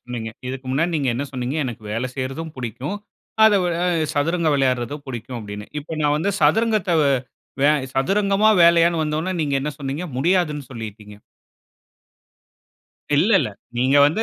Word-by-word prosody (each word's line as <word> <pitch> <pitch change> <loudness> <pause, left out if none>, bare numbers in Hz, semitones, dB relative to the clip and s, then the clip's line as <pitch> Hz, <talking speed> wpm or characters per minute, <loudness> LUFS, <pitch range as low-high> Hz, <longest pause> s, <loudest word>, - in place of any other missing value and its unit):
சொன்னீங்க? 120 -2 -6 0.2
இதுக்கு 130 0 -6
முன்னாடி 165 +6 +1
நீங்க 140 -3 0
என்ன 135 +4 -2
சொன்னீங்க, 130 +2 -3
எனக்கு 120 -4 -6
வேல 115 +4 -2
செய்றதும் 135 +5 -4
புடிக்கும், 130 - -4 0.5
அத 220 - +7
வ - - +1 0.4
எ - - -2
சதுரங்க 165 +3 +1
விளையாடுறதும் 135 +1 0
புடிக்கும் 120 0 -6
அப்பிடின்னு. 105 -1 -7
இப்ப 155 +2 -7
நான் 145 0 +3
வந்து 165 +6 0
சதுரங்கத்த 215 +4 +2
வே 140 - +3 0.5
வே 145 - +6 0.3
சதுரங்கமா? 200 +8 +3
வேலையான்னு 170 -1 +5
வந்த 150 0 -1
ஒன்னே, 185 +3 -2
நீங்க 145 -2 -1
என்ன 150 +2 -2
சொன்னீங்க? 140 +4 -4
முடியாதுன்னு 155 -2 +1
சொல்லிட்டீங்க. 105 -3 -8 2.0
இல்ல, 185 +9 +3
இல்ல. - - -2 0.3
நீங்க 130 +3 +3
வந்து 170 +9 0
145 Hz, 150 wpm, -21 LUFS, 125-170 Hz, 2.0 s, அத